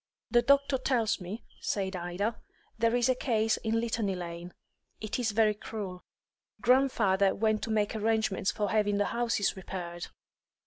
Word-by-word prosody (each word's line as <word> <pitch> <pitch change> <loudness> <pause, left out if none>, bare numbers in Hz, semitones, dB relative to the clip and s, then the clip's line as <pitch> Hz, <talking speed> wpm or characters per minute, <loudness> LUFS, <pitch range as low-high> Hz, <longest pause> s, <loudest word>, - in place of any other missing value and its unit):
"The 240 - +5
doctor 280 0 +3
tells 240 -6 +1
me," 190 +6 -6 0.2
said 190 -2 -2
Ida, 180 +6 -3 0.3
"there 230 +1 +2
is 245 0 +3
a 260 - +4
case 225 -4 +1
in 225 0 0
Litany 225 -4 -1
Lane. 175 0 -6 0.5
It 215 +3 -3
is 240 -3 +1
very 215 0 +3
cruel. 200 -4 -7 0.6
Grandfather 230 -7 +3
went 215 0 +1
to - - -8
make 215 -1 +1
arrangements 220 -3 +1
for 210 -2 -1
having 210 -2 +2
the 205 - +2
houses 230 -4 0
repaired." 175 -2 -6
215 Hz, 150 wpm, -30 LUFS, 195-230 Hz, 0.6 s, The